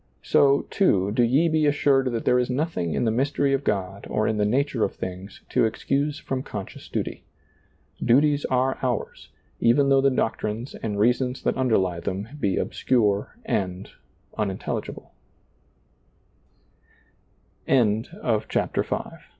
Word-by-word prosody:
So, 140 Hz, 0 st, +4 dB
too, 100 Hz, -, +2 dB
do 115 Hz, -, +1 dB
ye 135 Hz, +8 st, +3 dB
be 155 Hz, -2 st, +2 dB
assured 140 Hz, -2 st, +3 dB
that 115 Hz, -1 st, -3 dB
there 125 Hz, -, +4 dB
is 125 Hz, -, 0 dB
nothing 125 Hz, -, -1 dB
in -, -, 0 dB
the 110 Hz, -, +2 dB
mystery 140 Hz, +3 st, +1 dB
of 135 Hz, 0 st, 0 dB
God 100 Hz, -3 st, -2 dB
or 110 Hz, 0 st, 0 dB
in 110 Hz, -, 0 dB
the 105 Hz, -, +2 dB
nature 130 Hz, 0 st, +1 dB
of -, -, -1 dB
things 95 Hz, +2 st, -7 dB
to -, -, +2 dB
excuse 140 Hz, +6 st, -1 dB
from 135 Hz, -5 st, -3 dB
conscious -, -, -8 dB
duty. -, -, -4 dB, 0.8 s
Duties 145 Hz, +4 st, +3 dB
are 130 Hz, +1 st, 0 dB
ours, 125 Hz, -4 st, -3 dB, 0.3 s
even 135 Hz, +4 st, +4 dB
though 135 Hz, 0 st, +5 dB
the 135 Hz, -, +4 dB
doctrines 115 Hz, -1 st, -2 dB
and 105 Hz, -2 st, -4 dB
reasons 125 Hz, +3 st, +1 dB
that -, -, +1 dB
underlie 95 Hz, -9 st, +1 dB
them 95 Hz, +5 st, -4 dB
be 100 Hz, -8 st, 0 dB
obs -, -, -5 dB
125 Hz, 125 wpm, -24 LUFS, 105-140 Hz, 0.8 s, though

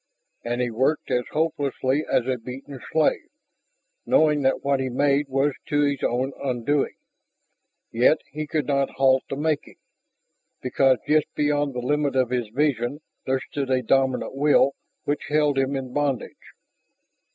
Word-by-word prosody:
And 120 Hz, +1 st, -2 dB
he 120 Hz, -1 st, -1 dB
worked 130 Hz, +7 st, 0 dB
as 125 Hz, 0 st, +1 dB
hopelessly 145 Hz, -2 st, 0 dB
as 120 Hz, -, +2 dB
a 130 Hz, -1 st, -1 dB
beaten 130 Hz, +3 st, -9 dB
slave, 160 Hz, -1 st, +1 dB, 0.7 s
knowing 150 Hz, -2 st, +3 dB
that 135 Hz, -1 st, +1 dB
what 140 Hz, -1 st, +1 dB
he 130 Hz, -1 st, -1 dB
made 140 Hz, +3 st, +1 dB
was 135 Hz, +2 st, +1 dB
to 145 Hz, 0 st, +1 dB
his 140 Hz, -1 st, 0 dB
own 130 Hz, +3 st, 0 dB
undoing. 135 Hz, +2 st, 0 dB, 1.0 s
Yet 125 Hz, +7 st, +4 dB
he 155 Hz, 0 st, -5 dB
could 150 Hz, -2 st, -1 dB
not 140 Hz, 0 st, +1 dB
halt 135 Hz, -1 st, +3 dB
the -, -, -3 dB
making, 150 Hz, +1 st, -2 dB, 0.8 s
because 130 Hz, 0 st, +2 dB
just 155 Hz, 0 st, +3 dB
beyond 145 Hz, -2 st, 0 dB
the 125 Hz, -, -2 dB
limit 145 Hz, 0 st, 0 dB
of 130 Hz, -2 st, +1 dB
his 120 Hz, -3 st, -1 dB
vision 135 Hz, +1 st, 0 dB, 0.3 s
there 130 Hz, 0 st, +1 dB
stood 140 Hz, -2 st, -3 dB
a 130 Hz, -1 st, +1 dB
dominant 130 Hz, +1 st, +1 dB
will 140 Hz, 0 st, +4 dB, 0.3 s
which 145 Hz, -, -2 dB
held 150 Hz, -2 st, +2 dB
him 135 Hz, +1 st, 0 dB
in 130 Hz, -2 st, -5 dB
bondage. 145 Hz, -3 st, -3 dB
135 Hz, 150 wpm, -24 LUFS, 130-145 Hz, 1.0 s, Yet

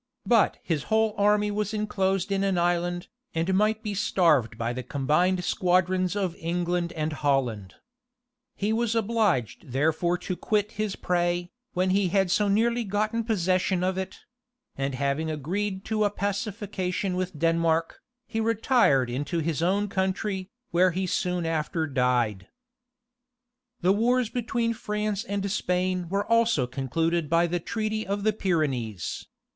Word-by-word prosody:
But 230 Hz, -3 st, +3 dB
his 155 Hz, -5 st, -1 dB
whole 220 Hz, -1 st, +2 dB
army 210 Hz, 0 st, +3 dB
was 210 Hz, +1 st, -2 dB
enclosed 195 Hz, -2 st, 0 dB
in 195 Hz, 0 st, +1 dB
an 195 Hz, -2 st, +1 dB
island, 175 Hz, +1 st, 0 dB, 0.3 s
and 165 Hz, +4 st, +1 dB
might 215 Hz, +3 st, +2 dB
be 210 Hz, -2 st, -3 dB
starved 165 Hz, -, +2 dB
by 115 Hz, +1 st, -2 dB
the 130 Hz, -, -4 dB
combined 155 Hz, +8 st, +1 dB
squadrons 185 Hz, +1 st, +1 dB
of 190 Hz, -4 st, -1 dB
England 175 Hz, +1 st, -1 dB
and 155 Hz, -1 st, -2 dB
Holland. 125 Hz, -10 st, -1 dB, 0.8 s
He 210 Hz, +2 st, 0 dB
was 230 Hz, 0 st, 0 dB
obliged 205 Hz, -, 0 dB
therefore 160 Hz, +5 st, +1 dB
to 180 Hz, +1 st, -4 dB
quit 210 Hz, +2 st, 0 dB
his 215 Hz, -2 st, -2 dB
prey, 175 Hz, 0 st, 0 dB, 0.2 s
when 185 Hz, +1 st, +1 dB
he 195 Hz, 0 st, +3 dB
had 190 Hz, 0 st, +2 dB
so 210 Hz, +2 st, +2 dB
nearly 235 Hz, +4 st, +2 dB
gotten 215 Hz, +3 st, -1 dB
possession 185 Hz, -3 st, +1 dB
of 185 Hz, 0 st, +1 dB
it; 190 Hz, 0 st, -5 dB, 0.5 s
and 135 Hz, -1 st, -2 dB
having 140 Hz, +4 st, -1 dB
agreed 190 Hz, +7 st, -3 dB
to 215 Hz, -1 st, 0 dB
a 205 Hz, -, +3 dB
pacification 200 Hz, -2 st, -2 dB
with 180 Hz, -3 st, -3 dB
Denmark, 165 Hz, 0 st, +1 dB, 0.2 s
he 225 Hz, -, -3 dB
retired 225 Hz, -, +3 dB
into 145 Hz, +8 st, -3 dB
his 160 Hz, -1 st, -1 dB
own 195 Hz, +4 st, +1 dB
country, 190 Hz, 0 st, -2 dB, 0.2 s
where 185 Hz, +2 st, +4 dB
he 185 Hz, +2 st, -2 dB
soon 180 Hz, -1 st, -1 dB
after 160 Hz, 0 st, -1 dB
died. 125 Hz, -8 st, 0 dB, 1.3 s
The 185 Hz, +2 st, +4 dB
wars 240 Hz, +2 st, +2 dB
between 230 Hz, -1 st, -1 dB
France 210 Hz, -2 st, -2 dB
and 200 Hz, -2 st, -2 dB
Spain 180 Hz, -2 st, 0 dB
were 200 Hz, +2 st, 0 dB
also 230 Hz, -, +3 dB
concluded 150 Hz, +6 st, -1 dB
by 170 Hz, +1 st, +4 dB
the 175 Hz, +1 st, -1 dB
treaty 215 Hz, +3 st, -3 dB
of 200 Hz, +1 st, -2 dB
the 215 Hz, 0 st, +3 dB
Pyrenees. 135 Hz, -, -2 dB
185 Hz, 145 wpm, -26 LUFS, 165-210 Hz, 1.3 s, where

